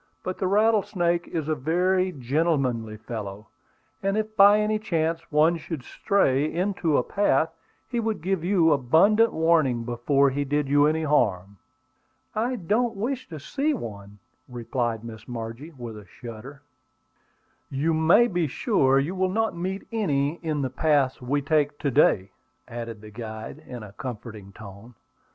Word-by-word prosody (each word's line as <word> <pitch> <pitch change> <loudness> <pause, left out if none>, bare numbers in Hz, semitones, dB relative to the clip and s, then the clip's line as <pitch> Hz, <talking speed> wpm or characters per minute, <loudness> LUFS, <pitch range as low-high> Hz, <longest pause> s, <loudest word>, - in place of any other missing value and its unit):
But 185 - -4
the 190 - 0
rattlesnake 195 -4 +2
is 160 -3 -3
a 155 - +1
very 180 +6 +1
gentlemanly 130 -6 -1
fellow; 105 -2 -7 0.5
and 195 +1 0
if 215 0 -2
by 205 0 +7
any 215 0 +1
chance 165 -5 -2
one 155 +3 +4
should 160 -3 -6
stray 150 - +1
into 175 -3 0
a - - +2
path, 165 -4 +1 0.3
he 240 - -2
would 220 -6 -2
give 190 -2 -1
you 175 -3 +3
abundant 165 - +4
warning 160 -7 +2
before 135 +4 +2
he 145 +2 -1
did 145 +1 -1
you 145 +1 +4
any 160 +1 0
harm." 100 - +1 0.8
"I 240 +3 -1
don't 225 +4 0
wish 245 +6 -3
to 160 -3 -7
see 285 - -1
one," 105 - -8 0.3
replied 120 -2 -3
Miss 115 -1 -10
Margie, 115 +4 -6
with 120 -8 -8
a 105 -2 -12
shudder. 125 +6 -10 1.1
"You 145 +4 0
may 165 +9 +5
be 175 -8 0
sure 135 - +2
you 145 +6 0
will 185 0 0
not 225 +2 0
meet 190 +3 -4
any 155 -8 0
in 155 -3 -1
the 130 - -2
paths 140 -1 +1
we 140 +3 -1
take 145 -1 +1
to 140 - -1
day," 95 -5 +3 0.4
added 115 -3 -7
the 110 0 -12
guide 110 +3 -7
in 120 -3 -7
a 105 - -10
comforting 110 -4 -8
tone. 105 +3 -12
150 Hz, 155 wpm, -25 LUFS, 120-185 Hz, 1.1 s, by